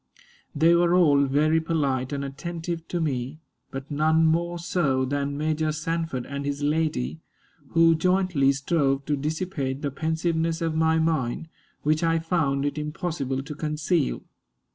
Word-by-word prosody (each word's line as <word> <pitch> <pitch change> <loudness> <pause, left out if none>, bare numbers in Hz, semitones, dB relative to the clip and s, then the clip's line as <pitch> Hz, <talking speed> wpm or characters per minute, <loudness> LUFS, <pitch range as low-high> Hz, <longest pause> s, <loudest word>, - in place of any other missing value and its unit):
They 165 +3 +5
were 170 0 +4
all 145 -6 +5
very 155 +4 +2
polite 140 -6 -1
and 140 -1 -2
attentive 165 +4 -5
to 175 - -2
me, 140 -2 -2 0.3
but 135 +2 -7
none 160 +2 +3
more 170 +2 +1
so 150 -6 0
than 140 +1 -2
Major 155 +1 0
Sanford 160 -4 -3
and 140 0 -5
his 145 0 -3
lady, 145 - 0 0.5
who 165 0 +6
jointly 180 -4 +2
strove 140 -1 0
to 150 - +1
dissipate 145 -2 -3
the 145 - -1
pensiveness 160 +2 -1
of 165 -2 -1
my 160 0 +2
mind, 160 -2 0 0.3
which 155 +2 +1
I 165 0 +3
found 160 -5 0
it 145 +1 -2
impossible 150 -4 -3
to 150 +2 -7
conceal. 150 - -1
155 Hz, 145 wpm, -25 LUFS, 140-165 Hz, 0.5 s, who